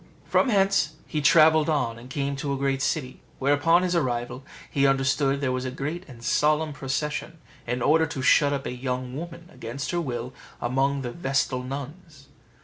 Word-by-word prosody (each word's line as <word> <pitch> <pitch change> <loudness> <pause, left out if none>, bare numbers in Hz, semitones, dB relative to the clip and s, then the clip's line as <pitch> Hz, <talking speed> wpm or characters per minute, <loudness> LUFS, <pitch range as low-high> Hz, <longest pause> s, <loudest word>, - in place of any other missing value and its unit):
From 270 - +2
hence 195 -8 +2
he 155 - -2
travelled 155 +1 +5
on, 120 -7 0
and 125 +2 -12
came 140 +1 -2
to 140 +1 -3
a 140 - -1
great 135 0 0
city, 130 -3 -2 0.2
where, 140 +2 +2
upon 165 +5 +4
his 180 -1 0
arrival, 125 -3 -1 0.2
he 140 -1 +2
understood 135 +1 +1
there 135 -2 0
was 130 0 -2
a 130 - -2
great 150 +8 -4
and 120 -3 -12
solemn 150 +3 +2
procession, 150 +4 -3 0.3
in 125 0 -1
order 160 +2 +4
to 135 -3 -5
shut 145 +1 +5
up 140 -1 -2
a - - -3
young 125 0 -4
woman, 170 +2 -7
against 120 +4 -5
her 175 -1 0
will, 125 -4 -4 0.3
among 135 +3 0
the 120 - -4
vestal 135 -3 -1
nuns. 140 +3 -8
140 Hz, 185 wpm, -25 LUFS, 130-155 Hz, 0.3 s, travelled